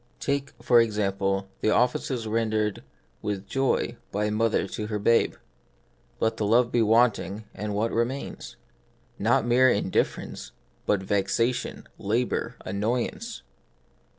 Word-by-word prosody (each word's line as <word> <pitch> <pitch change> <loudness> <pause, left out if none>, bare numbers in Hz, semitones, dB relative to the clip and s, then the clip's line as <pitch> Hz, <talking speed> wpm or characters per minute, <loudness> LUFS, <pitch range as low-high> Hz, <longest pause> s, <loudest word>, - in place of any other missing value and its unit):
Take, 140 0 -1
for 120 -1 +5
example, 100 -3 0
the 110 - +1
offices 125 +1 +1
rendered 110 -2 0 0.4
with 100 -2 -3
joy 135 -3 0
by 105 +1 0
a 105 - 0
mother 110 +1 +1
to 105 - -4
her 105 -1 -2
babe: 115 +3 +3 0.8
let 110 - +1
the 105 - 0
love 120 +2 +4
be 120 - +3
wanting, 110 -3 +2
and 105 0 -4
what 110 +3 0
remains? 120 +4 -3 0.6
Not 120 +3 +3
mere 125 +2 +5
indif 100 -4 +2
ference, - - -8 0.3
but 100 -2 +2
vexation, 115 +5 0
labour, 115 +5 -1
annoyance. 105 - -2
110 Hz, 125 wpm, -26 LUFS, 105-120 Hz, 0.8 s, for